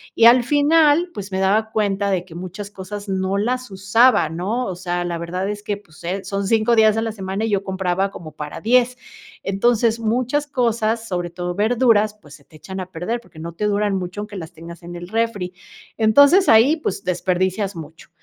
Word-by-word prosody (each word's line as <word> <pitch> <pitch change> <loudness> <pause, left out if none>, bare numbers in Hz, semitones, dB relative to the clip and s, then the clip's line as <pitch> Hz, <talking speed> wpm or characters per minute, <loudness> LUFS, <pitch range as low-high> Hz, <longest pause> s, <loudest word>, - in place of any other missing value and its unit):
y 230 - +5
al 240 +1 +7
final, 300 +4 +3
pues 200 -1 -7
me 190 - -2
daba 210 +3 +2
cuenta 200 -2 0
de 180 -2 -1
que 165 - -14
muchas 185 +4 -7
cosas 205 +2 -8
no 190 0 -1
las 250 +4 -1
usaba, 205 +6 +3
¿no?, 200 +10 -2
o 185 - -4
sea, 175 0 -3
la 170 -1 -3
verdad 180 +3 -3
es 205 0 -6
que, 205 -1 -3
pues, 170 -6 -19
eh, 190 +3 -3
son 195 +1 -3
5 225 +2 +3
días 220 -1 +4
a 225 - 0
la 225 - -2
semana 195 +1 -3
y - - -2
yo 200 -1 +1
compraba 190 0 -1
como 160 -5 -10
para 150 0 -7
10. 250 +2 +2 0.5
Entonces, 230 +3 +1
muchas 255 +6 0
cosas, 230 -4 0
sobre 175 -2 -3
todo 175 +1 -4
verduras, 215 0 +2
pues 150 -7 -16
se 140 - -15
te 155 - -21
echan 190 +6 -8
a 185 - -5
perder, 185 +7 -4
porque 165 - -20
no 165 +1 -7
te 210 +5 -3
duran 205 -1 +1
mucho 185 +2 -4
aunque 210 0 -8
las 165 -3 -7
tengas 170 +1 -11
en 175 0 -9
el 175 +1 -8
refri. 220 -5 -1 0.4
Entonces, 285 - +5
ahí, 245 +9 +6
pues, 250 - -4
desperdicias 185 +2 -1
mucho. 160 0 -11
200 Hz, 205 wpm, -21 LUFS, 180-230 Hz, 0.5 s, al